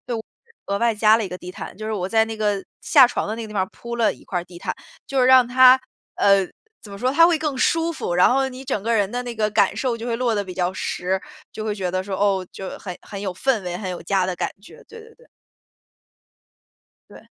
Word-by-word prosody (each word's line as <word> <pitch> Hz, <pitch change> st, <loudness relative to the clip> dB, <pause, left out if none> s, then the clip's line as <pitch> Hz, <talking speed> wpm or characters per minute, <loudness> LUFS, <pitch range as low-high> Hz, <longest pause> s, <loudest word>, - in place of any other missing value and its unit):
就 220 Hz, -, -5 dB, 0.4 s
额 200 Hz, -, 0 dB
外 235 Hz, 0 st, +2 dB
加 215 Hz, +1 st, +5 dB
了 225 Hz, -, -2 dB
一 -, -, -4 dB
个 180 Hz, 0 st, -7 dB
地 180 Hz, 0 st, -9 dB
毯， 200 Hz, -, -8 dB
就 215 Hz, -, -6 dB
是 -, -, -2 dB
我 185 Hz, -2 st, -2 dB
在 220 Hz, +1 st, +3 dB
那 225 Hz, 0 st, -6 dB
个 205 Hz, -2 st, 0 dB, 0.2 s
下 270 Hz, -5 st, +6 dB
床 -, -, -3 dB
的 215 Hz, -, -3 dB
那 230 Hz, -, -6 dB
个 220 Hz, -, -6 dB
地 210 Hz, -, -10 dB
方 190 Hz, -2 st, +1 dB
儿 -, -, -4 dB
铺 235 Hz, 0 st, -7 dB
了 230 Hz, -2 st, +2 dB
一 -, -, -18 dB
块 180 Hz, -, -3 dB
儿 -, -, -7 dB
地 175 Hz, -1 st, -13 dB
毯， -, -, -3 dB, 0.3 s
就 275 Hz, -2 st, -1 dB
是 250 Hz, -, +4 dB
让 255 Hz, -1 st, +6 dB
它 255 Hz, +1 st, +7 dB, 0.4 s
呃， 195 Hz, -2 st, +4 dB, 0.3 s
怎 205 Hz, -, -12 dB
么 200 Hz, -, -8 dB
说， 250 Hz, +5 st, 0 dB
它 330 Hz, +4 st, +6 dB
会 340 Hz, -2 st, +3 dB
更 300 Hz, -4 st, -2 dB
舒 330 Hz, +4 st, +2 dB
服， 175 Hz, -, -4 dB
然 180 Hz, +6 st, +5 dB
后 270 Hz, +1 st, +2 dB
你 260 Hz, +1 st, -9 dB
整 255 Hz, -7 st, -2 dB
个 230 Hz, +1 st, +1 dB
人 205 Hz, -3 st, +2 dB
的 245 Hz, 0 st, -3 dB
那 240 Hz, -1 st, -5 dB
个 215 Hz, 0 st, +1 dB
感 205 Hz, -2 st, +2 dB
受 250 Hz, -3 st, -1 dB
就 230 Hz, -, -7 dB
会 235 Hz, -1 st, -1 dB
落 235 Hz, -2 st, 0 dB
得 205 Hz, -, 0 dB
比 185 Hz, -1 st, -8 dB
较 180 Hz, 0 st, -1 dB
实， 190 Hz, 0 st, -2 dB, 0.3 s
就 215 Hz, -, -6 dB
会 210 Hz, -, -1 dB
觉 190 Hz, -3 st, -3 dB
得 185 Hz, +1 st, -2 dB
说， 195 Hz, 0 st, -4 dB
哦， 195 Hz, -2 st, +1 dB
就 190 Hz, -, -7 dB
很 180 Hz, -3 st, -7 dB
很 200 Hz, -, -8 dB
有 195 Hz, -2 st, -3 dB
氛 230 Hz, 0 st, 0 dB
围， 175 Hz, -1 st, -4 dB
很 185 Hz, -2 st, -5 dB
有 180 Hz, -, -5 dB
家 190 Hz, +1 st, +1 dB
的 185 Hz, -1 st, -3 dB
感 -, -, -2 dB
觉， 475 Hz, -, -15 dB
对 460 Hz, -, -12 dB
对 450 Hz, 0 st, -15 dB
对。 485 Hz, -, -22 dB, 1.8 s
对。 -, -, -14 dB
215 Hz, 285 characters per minute, -22 LUFS, 190-250 Hz, 1.8 s, 它